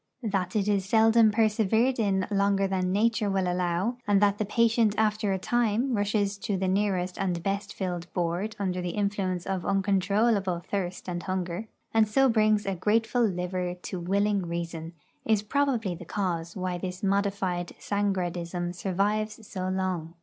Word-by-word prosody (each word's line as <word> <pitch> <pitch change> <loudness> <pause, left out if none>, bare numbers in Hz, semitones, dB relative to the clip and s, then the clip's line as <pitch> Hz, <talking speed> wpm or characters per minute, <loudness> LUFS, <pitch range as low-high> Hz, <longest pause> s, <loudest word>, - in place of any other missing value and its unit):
That 195 -4 -1
it 205 -1 +1
is 200 -2 +2
seldom 225 +2 +5
persevered 220 +3 +2
in 195 -3 +1
longer 200 -1 +2
than 185 -1 0
Nature 215 +1 +2
will 190 -2 0
allow, 180 +6 0
and 205 -1 +4
that 205 0 +2
the 215 - 0
patient 230 0 +2
after 215 -1 +1
a 190 - +1
time 240 +4 +1
rushes 205 -1 0
to 200 0 -2
the 190 0 -1
nearest 185 -2 0
and 180 -3 -1
best 200 +1 -2
filled 180 -2 -4
board 180 +5 -2
under 185 -2 -2
the 180 -1 -3
influence 195 -3 -1
of 190 -2 -2
uncontrollable 195 -1 +1
thirst 185 -2 -3
and 175 -1 -3
hunger, 185 +2 -3 0.3
and 220 -1 +4
so 270 +5 +4
brings 215 -2 +3
a 195 - -1
grateful 220 +6 +1
liver 180 -3 -1
to 180 0 -6
willing 200 +1 +1
reason, 170 -1 -4 0.3
is 215 -2 +2
probably 240 -5 0
the 175 +1 -9
cause 170 -3 -3
why 185 -2 -2
this 180 +1 -5
modified 195 -3 0
Sangradism 175 -3 -2
survives 210 +4 -1
so 185 -1 -3
long. 185 -3 -2
195 Hz, 160 wpm, -27 LUFS, 180-210 Hz, 0.3 s, seldom